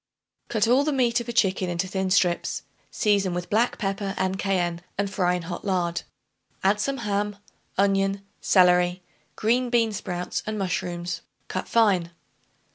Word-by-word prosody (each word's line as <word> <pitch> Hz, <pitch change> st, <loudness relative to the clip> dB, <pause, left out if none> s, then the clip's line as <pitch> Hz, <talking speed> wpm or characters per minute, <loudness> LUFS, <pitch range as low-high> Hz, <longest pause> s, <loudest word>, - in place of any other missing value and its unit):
Cut 220 Hz, -1 st, +2 dB
all 255 Hz, +4 st, +5 dB
the 305 Hz, -, 0 dB
meat 245 Hz, -3 st, +2 dB
of 235 Hz, -, -6 dB
a -, -, 0 dB
chicken 190 Hz, -5 st, +2 dB
into 175 Hz, +2 st, -1 dB
thin 190 Hz, 0 st, -1 dB
strips; 180 Hz, -2 st, +1 dB, 0.3 s
season 200 Hz, -4 st, +1 dB
with 175 Hz, +3 st, -4 dB
black 230 Hz, +4 st, +2 dB
pepper, 195 Hz, -1 st, -2 dB
and 190 Hz, +1 st, -1 dB
cayenne, 175 Hz, -3 st, 0 dB, 0.2 s
and 200 Hz, 0 st, +1 dB
fry 180 Hz, -2 st, +2 dB
in 180 Hz, -, -4 dB
hot 175 Hz, +1 st, -6 dB
lard. 175 Hz, -3 st, 0 dB, 0.6 s
Add 200 Hz, +2 st, +3 dB
some 275 Hz, +4 st, -1 dB
ham, 205 Hz, 0 st, -1 dB, 0.4 s
onion, 195 Hz, 0 st, +2 dB
celery, 180 Hz, -1 st, +4 dB, 0.3 s
green 245 Hz, +3 st, +1 dB
bean 230 Hz, -2 st, +3 dB
sprouts 180 Hz, -3 st, -3 dB
and 215 Hz, 0 st, -2 dB
mushrooms 180 Hz, -2 st, -2 dB, 0.3 s
cut -, -, -4 dB
fine. 200 Hz, -7 st, +3 dB
195 Hz, 155 wpm, -25 LUFS, 180-215 Hz, 0.6 s, all